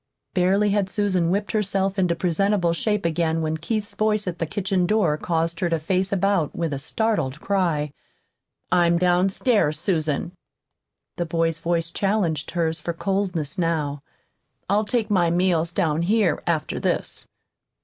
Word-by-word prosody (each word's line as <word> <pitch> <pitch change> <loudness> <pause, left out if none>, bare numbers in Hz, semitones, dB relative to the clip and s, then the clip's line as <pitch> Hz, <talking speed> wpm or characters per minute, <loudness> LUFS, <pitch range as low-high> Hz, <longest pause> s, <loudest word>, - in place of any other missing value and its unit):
Barely 195 +3 +3
had 200 -2 +1
Susan 185 -4 +1
whipped 200 +3 -1
herself 195 -2 0
into 180 -2 +2
presentable 180 +1 +1
shape 210 +2 -1
again 165 -1 0
when 155 0 -1
Keith's 210 +6 -3
voice 215 -1 +1
at 175 -2 -3
the 165 - -1
kitchen 185 0 0
door 205 -8 +2
caused 165 +1 -1
her 175 - 0
to 165 - +1
face 185 +4 0
about 195 -5 +1
with 165 -3 -2
a 140 - -3
startled 150 -4 -1
cry. 170 -7 0 0.8
"I'm 175 -1 +4
downstairs, 180 - +2
Susan." 160 -4 -1 0.9
The 175 -2 -2
boy's 165 0 0
voice 165 -1 -1
challenged 195 -7 0
hers 165 -2 -1
for 170 +2 -3
coldness 180 -4 -2
now. 155 -4 -1 0.7
"I'll 205 +3 +2
take 220 -1 -1
my 175 -4 +3
meals 170 -1 +1
down 160 -2 0
here, 200 -2 +2
after 165 -3 -1
this." - - -2
175 Hz, 150 wpm, -23 LUFS, 165-200 Hz, 0.9 s, I'm